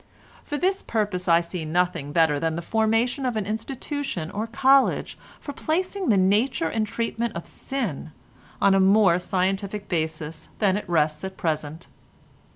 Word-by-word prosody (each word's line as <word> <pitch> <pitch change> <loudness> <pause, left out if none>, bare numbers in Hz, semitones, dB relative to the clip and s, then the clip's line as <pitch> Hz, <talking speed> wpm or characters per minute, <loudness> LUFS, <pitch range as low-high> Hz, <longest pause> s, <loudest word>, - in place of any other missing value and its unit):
For 295 - -4
this 375 +4 +1
purpose 205 -5 -2
I 170 0 +5
see 170 0 -5
nothing 170 -2 -1
better 160 -2 +3
than 165 0 -1
the 170 - -4
foundation 225 - +1
of 250 -3 -1
an 215 -2 -1
institution 225 - -4
or 215 +3 -3
college 265 +4 +3 0.2
for 285 - -7
placing 365 +6 -1
the 210 - +5
nature 200 +1 +2
and 215 +5 -1
treatment 230 0 -2
of 170 - -5
sin 210 - -4 0.5
on 200 - +4
a 195 - +4
more 190 -2 +5
scientific 195 +2 -1
basis 160 -2 -3
than 195 -3 +2
it 205 - -4
rests 155 -2 +1
at 190 0 -6
present. 155 0 -3
195 Hz, 160 wpm, -24 LUFS, 170-230 Hz, 0.5 s, I